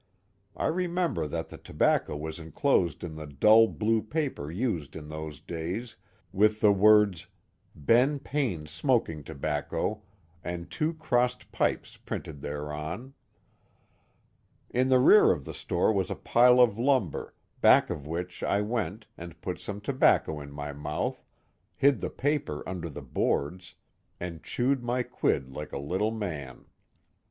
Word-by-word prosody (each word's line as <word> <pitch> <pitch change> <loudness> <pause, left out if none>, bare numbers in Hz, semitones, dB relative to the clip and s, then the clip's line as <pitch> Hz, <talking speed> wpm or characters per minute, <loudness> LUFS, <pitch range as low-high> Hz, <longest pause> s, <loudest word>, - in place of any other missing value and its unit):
I - - -1
remem 175 0 0
ber - - -2
that 80 +2 -4
the - - -11
tobacco 75 - +1
was 80 +2 -5
inclosed 85 - 0
in 80 -3 -6
the 75 -1 -7
dull 105 +11 +6
blue 110 0 0
paper 130 - -3
used 85 - -2
in 75 -1 -8
those 80 -2 -6
days, 85 +9 -5 0.4
with 105 +2 +3
the 105 - +5
words 105 -2 +4 0.3
" - - -44 0.2
Ben 125 - +3
Payn*s 115 - -2
Smoking 85 - 0
To 80 - -8
bacco 75 +1 -2 0.4
and 85 -1 -5
two 160 +2 -1
crossed 125 -5 0
pipes - - -1
printed 75 -4 -6
thereon. 75 - -5 1.6
In 130 +2 +1
the 130 - +6
rear 140 +11 +7
of 70 - -2
the - - -7
store 90 +5 0
was 95 -3 0
a - - -2
pile 125 +1 +4
of 115 -3 +4
lumber, 125 - 0 0.3
back - - +6
of 75 -2 -5
which 90 +2 -5
I 100 - +1
went 105 -1 -2
and 85 -1 -9
put - - -5
some 100 0 -6
tobacco 105 - +2
in 70 0 -9
my 70 0 -6
mouth, 75 +1 -3 0.5
hid 140 -2 +3
the - - -2
paper 145 - -2
under 90 -3 -4
the 75 -1 -8
boards, 75 +7 -2 0.4
and 85 -2 -6
chewed 130 +1 0
my 120 +1 0
quid 65 - -1
like 75 +3 -7
a - - -4
little 90 +10 -1
man. 85 - -5
95 Hz, 150 wpm, -28 LUFS, 75-120 Hz, 1.6 s, rear